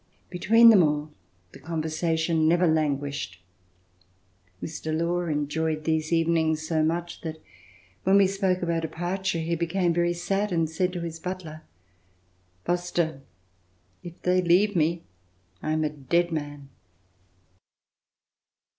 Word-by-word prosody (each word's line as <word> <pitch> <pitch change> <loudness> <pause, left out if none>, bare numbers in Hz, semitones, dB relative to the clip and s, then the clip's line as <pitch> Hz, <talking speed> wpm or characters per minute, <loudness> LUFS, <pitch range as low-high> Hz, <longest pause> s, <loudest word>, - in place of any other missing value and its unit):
Between 225 +6 +6
them 205 -4 +6
all, 150 -1 0 0.4
the - - -13
conversa 160 0 -2
tion 160 -1 +1
never 175 +2 +4
languished. 145 - -1 1.2
Mr. 160 - -4
Law 175 +1 0
enjoyed 155 +1 -1
these 160 0 -1
even 165 0 +2
ings 160 -1 0
so 160 -1 +1
much 170 +2 -2
that 160 -1 -5 0.7
when 190 +1 +4
we 200 - +6
spoke 190 -1 0
of 170 - -2
our 165 -1 0
departure, 175 +3 -2
he 165 +1 -1
became 170 +1 0
very 175 0 +1
sad 195 +4 -1
and 165 -2 +1
said 180 +3 -1
to 175 - -4
his 165 -1 -5
butler, 170 -4 -6 1.0
''Foster, 175 -4 -1 0.8
if 175 0 -10
they 180 0 +3
leave 185 +4 +3
me, 165 +1 +1 0.6
I 155 - -2
am 155 0 0
a 155 - +1
dead 170 +4 0
man." 145 -3 -5
165 Hz, 135 wpm, -26 LUFS, 155-175 Hz, 1.2 s, Between